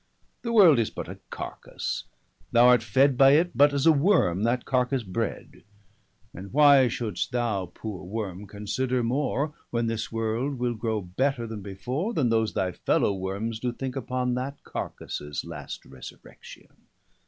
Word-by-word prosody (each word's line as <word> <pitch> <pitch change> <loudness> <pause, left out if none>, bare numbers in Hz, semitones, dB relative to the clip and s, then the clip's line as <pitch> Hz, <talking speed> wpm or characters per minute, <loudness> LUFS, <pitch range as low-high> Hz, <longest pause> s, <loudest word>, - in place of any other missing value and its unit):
The 235 - -3
world 185 - +7
is 115 - +1
but - - -7
a - - -9
carkasse; - - -5 0.5
thou 120 +1 +6
art 125 -2 +6
fed 130 +5 +3
55 130 - -6
By 135 0 +8
it, 170 +4 +3
but 145 +3 +6
as 140 0 0
a 165 - +8
worme, 145 - +3
that 120 +1 0
carkasse 125 0 0
bred; 110 +3 -4 0.7
And 95 +2 -9
why 140 -2 +6
should'st 110 -4 -3
thou, 115 -7 -1
poore 100 +1 -7
worme, 100 0 -5
consider 120 +5 -2
more, 140 +4 -1 0.2
When 115 -1 -1
this 115 -1 -3
world 115 +5 -2
will 120 0 -1
grow 110 -1 -2
better 120 +7 -1
then 110 -2 -6
before, 125 - -4
Then 130 -6 +2
those 110 -1 +1
thy 95 -1 0
fellow 100 - +1
wormes 100 +4 -3
doe 125 +1 -1
thinke 130 +1 -5
upon 125 -1 -2
That 130 +3 -4
carkasses 75 0 -5
last - - -8
resurrection. 65 -1 -13
120 Hz, 165 wpm, -26 LUFS, 105-135 Hz, 0.7 s, By